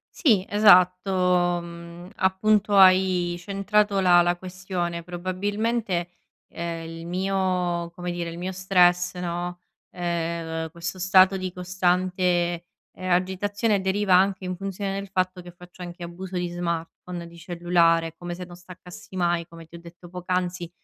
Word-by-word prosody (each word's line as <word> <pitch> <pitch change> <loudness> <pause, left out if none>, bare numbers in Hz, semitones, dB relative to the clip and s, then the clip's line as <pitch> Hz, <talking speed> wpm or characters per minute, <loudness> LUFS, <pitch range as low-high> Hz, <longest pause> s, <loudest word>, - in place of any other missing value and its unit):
Sì 220 - +3
esatto, 180 -3 +4
mhmm, 170 +1 -10
appunto 205 +2 +2
hai 185 -2 +5
centrato 200 +2 +1
la 175 -2 +6
la 175 0 +1
questione. 180 -2 -4
Probabilmente, 185 +2 -2 0.4
ehm, 165 -1 -5
il 165 0 -8
mio 180 -2 -1
come 180 0 -5
dire, 175 -1 -4
il 165 - -8
mio 180 +2 -3
stress 180 -1 +3
no, 175 0 -4 0.3
ehm, 165 -2 -3
questo 170 +2 -5
stato 185 +1 +5
di 185 -1 -4
costante, 180 0 -1 0.7
ehm, 185 - -7
agitazione 200 +3 0
deriva 190 0 0
anche 190 0 +2
in 185 0 -3
funzione 195 +1 -4
del 200 0 -5
fatto 185 -1 -1
che 175 0 -12
faccio 180 +1 -14
anche 175 0 -8
abuso 180 +2 -8
di 175 0 -1
smartphone, 170 0 -5
di 170 0 -15
cellulare, 170 -1 +1
come 175 0 -5
se 180 +1 -7
non 175 0 -12
staccassi 180 +1 -13
mai, 175 -2 0
come 165 -1 -13
ti 170 - -12
ho 170 - -12
detto 170 +1 -14
poc'anzi, 180 -1 -3
180 Hz, 145 wpm, -25 LUFS, 175-190 Hz, 0.7 s, la